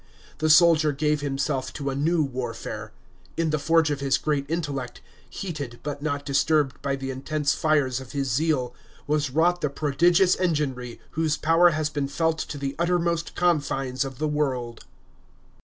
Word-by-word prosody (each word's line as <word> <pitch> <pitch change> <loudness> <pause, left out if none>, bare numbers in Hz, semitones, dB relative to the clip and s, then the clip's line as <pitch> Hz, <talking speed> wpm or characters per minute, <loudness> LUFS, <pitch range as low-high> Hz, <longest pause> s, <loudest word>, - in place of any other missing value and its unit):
The 155 0 +1
soldier 155 -1 +6
gave 150 +1 0
himself 135 -1 -2
to 140 -2 -3
a - - -4
new 160 +3 +2
warfare. 125 -4 -5 0.5
In 165 -2 +1
the 155 - 0
forge 160 0 +3
of 145 - -2
his 135 -1 +2
great 145 -2 -1
intellect, 140 -7 -3 0.3
heated, 145 -10 -6
but 145 -1 -4
not 145 -2 -2
disturbed 145 0 +1
by 140 -1 -1
the 135 0 -5
intense 140 +2 -1
fires 145 -5 +1
of 130 -1 -10
his 140 -2 -2
zeal, 130 -2 0 0.3
was 150 -1 0
wrought 175 +6 +2
the 150 - 0
prodigious 170 +6 +3
enginery 140 -9 -2
whose 160 -1 0
power 165 +3 +5
has 155 -1 -1
been 145 -2 -2
felt 160 +3 0
to 150 - -4
the 140 0 -4
uttermost 170 -1 0
confines 140 -7 0
of 135 -2 -7
the 155 - -1
world. 130 -6 -2
150 Hz, 165 wpm, -25 LUFS, 135-160 Hz, 0.5 s, soldier